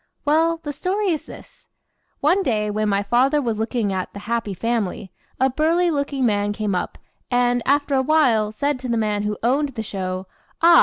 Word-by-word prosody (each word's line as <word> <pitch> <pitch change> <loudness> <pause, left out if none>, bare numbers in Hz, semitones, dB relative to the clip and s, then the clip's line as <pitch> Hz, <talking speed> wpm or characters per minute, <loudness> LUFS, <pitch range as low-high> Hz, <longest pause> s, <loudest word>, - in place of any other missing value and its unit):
Well, 325 +3 +3
the 295 -2 -4
story 385 +7 -1
is 315 -4 -2
this. - - -13 0.5
One 345 +7 +3
day, 210 - 0
when 215 0 0
my 200 0 +1
father 260 +7 +3
was 230 -6 -2
looking 220 -2 -1
at 185 -1 -3
"the 200 - -8
happy 225 -3 -2
family," 205 -3 -2 0.3
a 260 - +4
burly 335 +5 +2
looking 280 -3 -1
man 205 -2 +1
came 210 -2 -2
up, 180 - -3 0.3
and, 245 -1 +2
after 285 +1 +2
a 265 - +3
while, 255 -8 +3
said 285 +5 -1
to 255 -1 -5
the 235 - +1
man 210 -2 0
who 210 0 -2
owned 275 +5 +2
the 225 - -3
show: 185 -2 -4 0.3
"Ah! 335 0 +7
245 Hz, 195 wpm, -22 LUFS, 210-290 Hz, 0.5 s, Ah